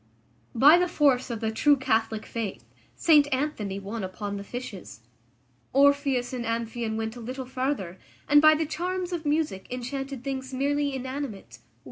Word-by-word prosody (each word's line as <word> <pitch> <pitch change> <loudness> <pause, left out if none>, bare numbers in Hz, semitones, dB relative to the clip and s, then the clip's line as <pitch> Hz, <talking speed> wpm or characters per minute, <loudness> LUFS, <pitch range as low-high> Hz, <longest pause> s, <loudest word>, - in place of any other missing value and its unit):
By 295 +8 +7
the 360 - +2
force 280 -7 +2
of 235 -2 -4
the 220 -1 0
true 290 +6 +4
Catholic 225 -3 0
faith 225 -4 -5 0.3
St 295 -3 +4
Anthony 260 -8 -2
won 200 +2 -5
upon 200 +2 -5
the 200 - -6
fishes. 205 - -8 0.7
Orpheus 275 -2 +3
and 245 -2 -3
Amphion 230 0 -2
went 220 +1 -3
a - - -9
little 255 +3 -5
farther, 255 -8 -3 0.3
and 295 0 +6
by 310 0 +7
the 315 +1 0
charms 360 +3 -3
of 325 -3 -3
music 295 -11 -1
enchanted 270 +1 -5
things 265 -1 -4
merely 285 +1 0
inanimate. 260 -4 -6
260 Hz, 155 wpm, -26 LUFS, 225-290 Hz, 0.7 s, By